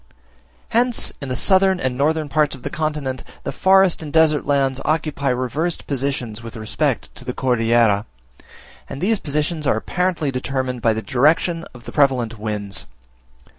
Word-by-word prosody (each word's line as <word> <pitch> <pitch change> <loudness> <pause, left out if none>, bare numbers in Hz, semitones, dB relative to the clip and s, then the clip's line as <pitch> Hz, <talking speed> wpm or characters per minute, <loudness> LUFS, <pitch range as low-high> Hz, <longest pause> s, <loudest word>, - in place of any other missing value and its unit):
Hence 240 +1 +1
in 140 - -5
the 130 - -1
southern 190 - +3
and 130 -4 -1
northern 155 +3 +1
parts 150 0 +1
of 130 - -14
the - - -4
continent, 150 -5 -2 0.2
the - - -3
forest 190 -2 +4
and 150 -2 -6
desert 155 -3 +3
lands 135 -2 +1
occupy 155 -2 0
reversed 130 +7 -1
positions 130 -5 -3
with 115 -1 -9
respect 110 -1 -1
to - - -11
the - - -5
Cordillera, 115 -4 +2 0.8
and - - -6
these 210 +4 +1
positions 150 +1 -1
are 110 - +3
apparently 175 +2 -1
determined 130 -1 -2
by 115 -1 +3
the 110 0 -4
direction 160 +5 +2
of 120 - -13
the - - -7
prevalent 125 -6 +1
winds. 105 -4 -4
140 Hz, 160 wpm, -21 LUFS, 125-160 Hz, 0.8 s, forest